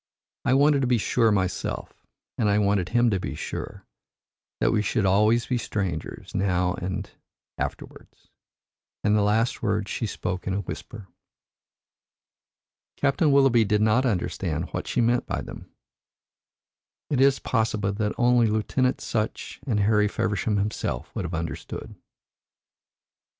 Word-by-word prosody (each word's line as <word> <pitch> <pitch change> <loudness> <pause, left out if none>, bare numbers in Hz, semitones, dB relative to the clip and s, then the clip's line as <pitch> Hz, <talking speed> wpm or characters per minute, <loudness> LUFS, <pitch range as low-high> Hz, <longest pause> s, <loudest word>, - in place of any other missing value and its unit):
I 130 - +4
wanted 145 0 +4
to 130 - +1
be 125 -1 +3
sure 115 +1 +2
myself, 95 -3 -3 0.3
and 105 - +1
I 100 - +3
wanted 100 -3 +1
him 120 -1 +3
to 95 - +1
be 70 -5 -4
sure, - - -6 0.7
that - - +2
we 105 - +2
should 105 0 0
always 105 +5 +3
be 125 -2 -1
strangers 95 -9 -4
now 90 -2 +1
and - - -8 0.2
and - - -21 0.5
afterwards," - - -7 0.7
and 105 0 +3
the 105 - +3
last 110 +3 +1
words 105 -2 -1
she 115 - -2
spoke 90 -2 -4
in 95 - 0
a 100 - -1
whisper. 105 0 -8 1.9
Captain 145 +2 +2
Willoughby 135 -4 +5
did 105 0 +1
not 110 +4 +3
understand 90 -5 -2
what - - -4
she 125 - +1
meant 120 +1 +2
by - - -2
them. - - -10 1.4
It 135 -3 +2
is 135 0 +5
possible 110 -4 0
that 105 0 -1
only 120 -1 +4
Lieutenant 120 +4 0
Sutch 110 -2 -3
and 105 -5 +1
Harry 105 0 +3
Feversham 105 +1 -1
himself 105 +2 -3
would 95 - -2
have 85 0 -4
understood. 80 0 -5
105 Hz, 145 wpm, -25 LUFS, 100-120 Hz, 1.9 s, Willoughby